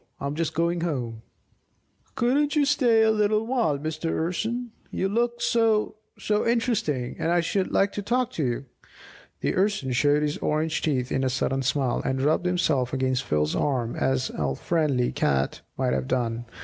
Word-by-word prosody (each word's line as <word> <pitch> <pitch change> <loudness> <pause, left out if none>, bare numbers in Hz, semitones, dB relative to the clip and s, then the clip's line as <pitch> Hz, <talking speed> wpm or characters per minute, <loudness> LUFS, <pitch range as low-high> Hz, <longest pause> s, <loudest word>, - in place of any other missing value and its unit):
I'm 140 +1 -3
just 160 0 -2
going 170 +1 +1
home." 125 -9 -3 0.9
"Couldn't 285 +5 +2
you 295 -1 +4
stay 245 -6 +4
a 220 - +4
little 215 0 +2
while, 235 - +1
Mr. 155 +3 -3
Urson? 220 +10 -2 0.2
You 190 - -1
look 235 +3 0
so 225 -2 +2 0.2
so 210 0 0
interesting, 225 - 0
and 165 - 0
I 175 0 +3
should 185 +3 -1
like 195 +1 +2
to 205 - -4
talk 250 +4 0
to 160 - -2
you!" 125 +1 -2 0.8
The - - 0
Urson 190 -9 +1
showed 145 +4 +3
his 150 0 -1
orange 155 +1 0
teeth 130 -4 -1
in 135 - 0
a 130 - +2
sudden 135 +1 0
smile, 130 -1 0
and 130 0 -1
rubbed 155 +6 +1
himself 150 -8 +1
against 130 0 0
Phil's 75 0 0
arm 125 -5 0
as 130 -1 0
al 70 -3 -2
friendly 145 - 0
cat 70 0 0 0.2
might - - +1
have 65 -1 -1
done. 120 -1 -1
155 Hz, 175 wpm, -25 LUFS, 130-215 Hz, 0.9 s, you